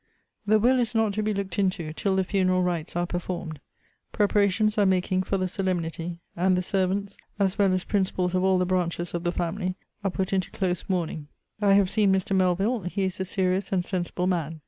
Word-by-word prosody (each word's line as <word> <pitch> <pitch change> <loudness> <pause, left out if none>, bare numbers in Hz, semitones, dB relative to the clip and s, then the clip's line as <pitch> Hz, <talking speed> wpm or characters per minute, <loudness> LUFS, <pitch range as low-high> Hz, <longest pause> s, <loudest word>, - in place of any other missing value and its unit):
The 215 +1 +5
will 250 +4 +3
is 235 -1 -1
not 220 -2 +2
to 215 - -1
be 215 0 0
looked 195 -2 -3
into, 185 -5 0
till 190 +4 0
the 190 - +2
funeral 185 -1 +1
rites 170 -3 -2
are 175 0 +1
performed. 175 -3 -4 0.5
Preparations 210 0 +2
are 205 - +4
making 185 0 +1
for 195 +1 -1
the 185 -1 0
solemnity; 175 -3 -2 0.2
and 185 +1 +2
the 180 - 0
servants, 195 +2 -1 0.2
as 195 -1 0
well 200 -2 +4
as 185 0 0
principals 185 -3 0
of 185 0 +1
all 190 0 +4
the 180 - +1
branches 175 -1 -1
of 170 -1 -3
the 175 - +1
family, 180 +2 -2 0.3
are 195 - +1
put 190 +1 -2
into 190 -1 0
close 180 -3 -2
mourning. 165 -5 -2 0.3
I 200 -1 +5
have 195 -2 +4
seen 210 -3 +3
Mr. 190 0 +1
Melvill. 190 +3 +1
He 195 +2 -2
is 185 -1 -1
a 190 - -1
serious 190 0 0
and 180 -2 +1
sensible 180 -1 -2
man. 165 -4 -1
185 Hz, 210 wpm, -26 LUFS, 180-200 Hz, 0.5 s, The